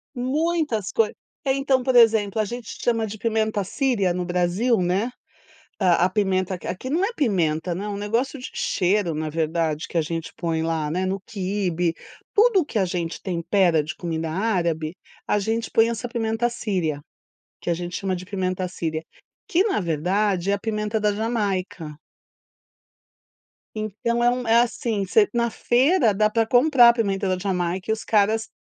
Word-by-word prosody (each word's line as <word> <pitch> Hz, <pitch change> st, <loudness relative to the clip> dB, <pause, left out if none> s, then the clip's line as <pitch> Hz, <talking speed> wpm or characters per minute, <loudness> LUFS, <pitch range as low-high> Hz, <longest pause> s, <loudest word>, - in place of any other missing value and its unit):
Muitas 275 Hz, -, -1 dB
coi, 225 Hz, -2 st, +2 dB, 0.3 s
eh, 265 Hz, -1 st, +2 dB
então 275 Hz, -1 st, +2 dB
por 260 Hz, 0 st, +1 dB
exemplo 220 Hz, -3 st, +5 dB
a 215 Hz, -, +2 dB
gente 235 Hz, +1 st, -7 dB, 0.2 s
chama 230 Hz, -2 st, +1 dB
de 215 Hz, +1 st, -7 dB
pimenta 220 Hz, -2 st, 0 dB
síria 205 Hz, -4 st, 0 dB
no 180 Hz, 0 st, -2 dB
Brasil, 180 Hz, +7 st, +1 dB
né, 185 Hz, +5 st, 0 dB, 0.7 s
a 180 Hz, -3 st, +3 dB
a -, -, +1 dB
pimenta 185 Hz, -2 st, 0 dB
q -, -, -8 dB
aqui 185 Hz, +8 st, -4 dB
não 335 Hz, +7 st, +1 dB
é 470 Hz, -, -3 dB
pimenta, 175 Hz, -, 0 dB
não 195 Hz, +4 st, -4 dB
é -, -, -4 dB
um 205 Hz, -, -3 dB
negócio 230 Hz, +7 st, -1 dB
de 255 Hz, -, -7 dB
cheiro 185 Hz, -2 st, +1 dB
na 155 Hz, 0 st, -2 dB
verdade 160 Hz, 0 st, -1 dB
que -, -, -4 dB
a 165 Hz, -, +4 dB
gente 165 Hz, +1 st, -4 dB
põe 165 Hz, -2 st, -1 dB
lá 160 Hz, -2 st, -1 dB
né 185 Hz, +3 st, -1 dB
no 190 Hz, +1 st, -2 dB
quibe, 185 Hz, -5 st, -1 dB, 0.4 s
tudo 425 Hz, -2 st, +5 dB
o 315 Hz, -, 0 dB
que 240 Hz, -, -4 dB
a 200 Hz, -, +3 dB
gente 175 Hz, -2 st, -3 dB
tempera 175 Hz, -2 st, +2 dB
de 155 Hz, -, -6 dB
comida 165 Hz, -2 st, -3 dB
árabe, 170 Hz, -5 st, -1 dB, 0.3 s
a 210 Hz, -, +1 dB
gente 225 Hz, +3 st, -2 dB
põe 225 Hz, 0 st, +4 dB
essa 235 Hz, +1 st, -3 dB
pimenta 225 Hz, 0 st, 0 dB
síria, 180 Hz, -10 st, -2 dB, 0.6 s
que -, -, -4 dB
a 170 Hz, -, +3 dB
gente 175 Hz, +1 st, -4 dB
chama 190 Hz, -2 st, -2 dB
de 180 Hz, -, -7 dB
pimenta 185 Hz, -1 st, -2 dB
síria, 160 Hz, -3 st, -3 dB, 0.5 s
que 355 Hz, +3 st, +3 dB
na 385 Hz, -, 0 dB
verdade 180 Hz, +4 st, 0 dB
é -, -, +3 dB
a 200 Hz, -, -1 dB
pimenta 210 Hz, 0 st, -2 dB
da 210 Hz, -1 st, +2 dB
jamaica. 200 Hz, -7 st, -2 dB, 1.8 s
Então 235 Hz, +3 st, -1 dB
é 240 Hz, -, +5 dB
um 250 Hz, -1 st, -2 dB
é, 225 Hz, +1 st, +5 dB
assim, 230 Hz, -3 st, -1 dB
você 420 Hz, -, +4 dB
na 235 Hz, 0 st, +1 dB
feira 245 Hz, -, +3 dB
dá 215 Hz, +2 st, +2 dB
pra 225 Hz, +1 st, +1 dB
comprar 245 Hz, 0 st, +6 dB
a -, -, +5 dB
pimenta 200 Hz, -4 st, -1 dB
da 185 Hz, -1 st, +1 dB
jamaica 180 Hz, -1 st, -2 dB
e -, -, +4 dB
os 220 Hz, -, -5 dB
caras 220 Hz, +1 st, +2 dB
205 Hz, 180 wpm, -23 LUFS, 180-230 Hz, 1.8 s, comprar